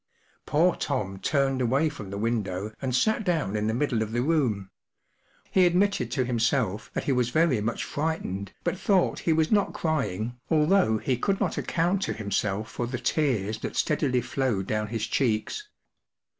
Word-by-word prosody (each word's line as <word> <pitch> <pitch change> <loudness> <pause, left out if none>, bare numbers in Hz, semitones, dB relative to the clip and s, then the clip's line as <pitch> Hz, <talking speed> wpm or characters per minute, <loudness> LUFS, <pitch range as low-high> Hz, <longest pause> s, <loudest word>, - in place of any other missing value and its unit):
Poor 170 +4 +3
Tom 95 -2 -2
turned 135 0 +1
away 135 +6 +2
from 105 -10 -6
the 100 - -5
window 105 -2 -2
and 130 -2 -1
sat 215 +12 +2
down 160 - 0
in 105 0 0
the 110 - +1
middle 125 -4 0
of 110 0 -3
the 120 +1 +1
room. 125 -11 0 0.8
He 190 - +5
admitted 200 +4 +1
to 130 -3 0
himself 120 -3 0
that - - -1
he - - 0
was 125 -2 +2
very 150 -5 +2
much 115 +3 -2
frightened, 145 - -3
but 185 - -1
thought 195 -4 +2
he - - +6
was 160 0 +2
not 205 -2 +2
crying, 120 - -2
although 155 - +3
he 125 +3 -1
could 195 - 0
not - - 0
account 175 +3 0
to - - -1
himself 105 0 -2
for 120 - -3
the 130 +1 -3
tears 120 -6 0
that - - -5
steadily 140 -5 +1
flowed 130 - -1
down 105 +1 -1
his 110 0 -2
cheeks. 120 - -1
125 Hz, 175 wpm, -27 LUFS, 110-155 Hz, 0.8 s, he